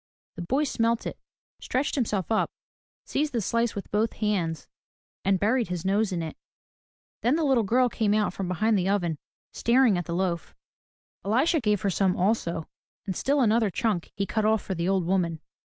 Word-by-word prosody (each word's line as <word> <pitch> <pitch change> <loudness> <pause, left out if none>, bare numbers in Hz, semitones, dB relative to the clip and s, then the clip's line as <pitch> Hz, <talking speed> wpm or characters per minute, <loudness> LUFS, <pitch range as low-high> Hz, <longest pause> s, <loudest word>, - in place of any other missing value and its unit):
The 175 - -7
boy 265 - +1
smelt 230 -4 0
it, - - -5 0.4
stretched 265 +3 -1
himself 215 - -1
up, 220 - +2 0.6
seized 295 0 -1
the 235 - +1
slice 230 +2 0
with 200 - -6
both 215 +2 +1
hands 175 -8 -1 0.6
and 195 -1 +2
buried 230 +3 +2
his 180 0 -4
nose 200 +2 +2
in 170 -2 -2
it. 160 - -6 0.9
Then 245 +5 +3
the 325 - 0
little 265 -5 +3
girl 250 +5 +3
came 215 -3 +1
out 215 -1 +1
from 195 - -4
behind 205 +4 +1
the 185 +1 0
oven, 175 -6 0 0.3
staring 235 -5 +3
at 175 - -4
the 170 - -3
loaf. 175 -3 -2 0.7
Elisha 265 - +2
gave 210 -3 +1
her 200 - +1
some 190 0 +1
also, 175 -4 0 0.4
and 190 -3 -3
still 280 +7 +1
another 225 -2 +3
chunk 195 -2 -1
he 200 - -1
cut 220 +2 -1
off 220 0 +2
for 190 - -3
the 170 +1 -1
old 190 -3 +1
woman. 170 -3 0
205 Hz, 190 wpm, -26 LUFS, 180-230 Hz, 0.9 s, Then